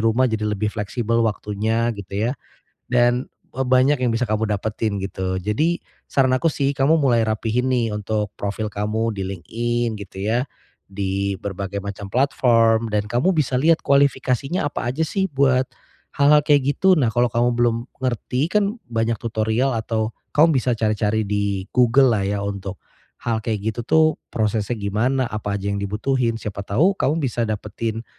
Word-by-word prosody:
rumah 115 +3 +3
jadi 110 -1 -1
lebih 105 0 -1
fleksibel 115 +2 -2
waktunya 110 +2 -1
gitu 100 +4 -2
ya. - - -1 0.6
Dan 120 0 +2 0.3
e 130 - -6
banyak 130 +2 +3
yang 125 -2 +1
bisa 120 +2 +1
kamu 110 0 0
dapetin 105 +1 -2
gitu. 95 -1 -3
Jadi 150 - 0 0.3
saran 130 -2 +2
aku 130 +6 +1
sih 140 0 0
kamu 145 +4 +3
mulai 120 -5 +3
rapihin, 110 +3 -1
nih, 120 -3 +1
untuk 105 0 -2
profil 105 +2 -3
kamu 110 +3 -1
di 95 - -3
LinkedIn 120 +6 -2
gitu 100 -1 -10
ya 115 +4 +1 0.5
di 100 0 -1
berbagai 100 0 -4
macam 100 0 -6
platform 115 -4 +3
dan 105 0 0
kamu 125 - +2
bisa 135 -4 +1
lihat 160 +5 +3
kualifikasinya 140 +2 +1
apa 140 - -4
aja 145 - -7
sih 195 +5 -1
buat 135 -2 +3 0.5
hal-hal 145 +1 +6
kayak 145 -1 +3
gitu. 190 0 +4
Nah, 130 -5 +2
kalau 120 +1 +2
kamu 120 +1 +2
belum 120 -1 +2 0.3
ngerti 130 +4 -1
kan 210 +1 +1
banyak 115 0 0
tutorial 115 +3 0
atau 110 0 -2 0.2
kamu 155 -1 +5
bisa 125 -1 0
cari-cari 110 0 0
di 100 -1 -1
Google-lah 125 -3 +4
ya 100 0 -1
untuk 100 -1 -5 0.5
hal 115 -1 0
kayak 110 -1 -2
gitu 120 - -5
tuh 160 0 +5 0.3
prosesnya 110 +1 -1
gimana, 110 +6 0
apa 105 -1 -3
aja 100 0 -3
yang 100 - -2
dibutuhin, 115 +4 0
siapa 105 -3 -6
tahu 150 - +3
kamu 150 +2 0
bisa 120 -2 0
dapetin 110 +2 -4
115 Hz, 165 wpm, -22 LUFS, 105-130 Hz, 0.6 s, hal-hal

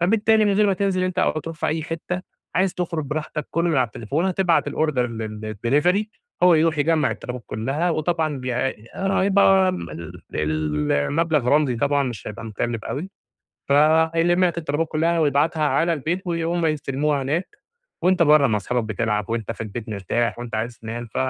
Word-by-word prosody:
فبالتالي 220 +4 +3
من 205 - +3
غير 210 +1 +3
ما 195 - +3
تنزِل 185 -1 0
أنت 185 0 -2
أو - - +3
ترُوح 165 +1 -7
في - - -2
أي 160 0 -1
حِتّة، 170 +3 -4 0.3
عايز 185 +1 +1
تخرُج 170 -4 -2
براحتك، 150 +1 -4
كلّه 170 +1 +1
من 155 - +1
على 130 -2 +3
التليفون، 125 - -2
هتبعت 180 -5 +2
الorder 140 -5 0
للdelivery 115 - 0 0.4
هو 180 -2 +7
يرُوح 160 -1 +2
يجمَّع 160 +1 +2
الطلبات 125 -1 -6
كلّها 140 +11 -1
وطبعًا 155 -2 -1
بيع 125 -1 -3 0.4
آآ 195 - -2
هيبقى 190 -1 +4
م 85 - -6 0.4
ال 75 -1 -1
المبلَغ 145 - +1
رمزي 145 -4 +3
طبعًا 145 +2 +1
مش 120 -5 -5
هيبقى 105 +2 -8
مكلِّف 115 +1 -3
أوي، 175 +8 -4 0.6
فهيلِم 160 +4 +4
لك 170 -1 -1
الطلبات 155 0 -1
كلّها 165 +2 +1
ويبعتها 155 +2 +2
على 160 +4 +2
البيت 165 +5 -2
وي 165 -1 -1
وهُم 170 0 0
يستلموها 145 -1 0
هناك 170 - -2 0.4
وأنت 180 -1 +4
برّه 150 -2 +5
مع 110 -2 +1
أصحابك 120 +4 -1
بتلعب، 105 -2 -1
وأنت 115 -1 -2
في 115 - -7
البيت 110 +1 -6
مرتاح، 110 +4 -1
وأنت 120 -2 -5
عايز 115 +2 -3
تنام، 115 +1 -6
ف - - -29
155 Hz, 180 wpm, -22 LUFS, 120-170 Hz, 0.6 s, هو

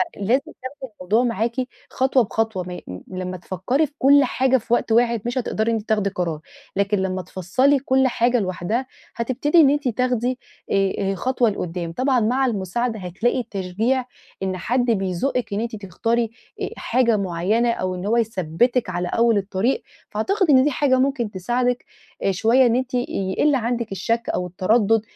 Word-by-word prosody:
فلازم 220 +7 +2
تاخدي 260 -2 -9
الموضوع 210 +6 +1
معاكِ 230 0 -1 0.3
خطوة 260 -1 +2
بخطوة. 220 -3 -1
ما 180 0 -7
ي - - -8
م 90 0 -7 0.2
لمّا 185 0 -4
تفكِّري 190 - 0
في 285 - -28
كل 280 +1 +6
حاجة 260 +1 +2
في 235 +1 -3
وقت 235 - +1
واحد 235 -1 +3
مش 240 +2 -2
هتقدري 230 -2 0
إن - - +1
أنتِ 215 - -8
تاخدي 210 -2 +2
قرار، 170 -5 -3 0.4
لكن 200 +1 +1
لمّا 190 -1 -1
تفصِّلي 190 - +1
كل 265 0 +2
حاجة 245 0 +2
لوحدها 195 +6 -2 0.3
هتبتدي 265 +7 +1
إن 275 - +6
أنتِ 290 -2 0
تاخدي، 250 +1 0 0.3
آآ، 195 -1 +2 0.2
آآ، - - -2
خطوة 250 +2 +1
لقدَّام. 175 -3 -4
طبعًا 255 +2 +2
مع 250 +5 +2
المساعدة 220 +1 -1
هتلاقي 190 +8 -1
التشجيع، 225 +4 -1 0.4
إن 185 -1 -2
حد 245 +7 0
بيزُقِّك 200 +4 -1
إن 205 - -1
أنتِ 230 -1 -4
تختاري، 225 +4 -1 0.3
آآ، - - -1
حاجة 235 -2 +2
معيَّنة، 200 +6 +1
أو 185 -4 -2
إن 180 +2 -6
هو 230 +3 +2
يثبِّتِك 225 +2 +1
على 180 0 -2
أول 230 0 +3
الطريق. 200 +5 0 0.3
فأعتقد 365 - 0
إن 260 -2 +6
دي 295 - +2
حاجة 260 -1 +2
ممكن 260 -5 0
تساعدِك، 245 +6 -1 0.4
آآ، 195 - +2
شوية، 230 +7 +4
إن 235 -1 +3
أنتِ 255 0 -2
يقِل 245 +3 0
عندك 235 -2 -2
الشك 230 +5 -1
أو 180 - -1
التردُّد 215 +4 +2
230 Hz, 175 wpm, -22 LUFS, 190-255 Hz, 0.4 s, كل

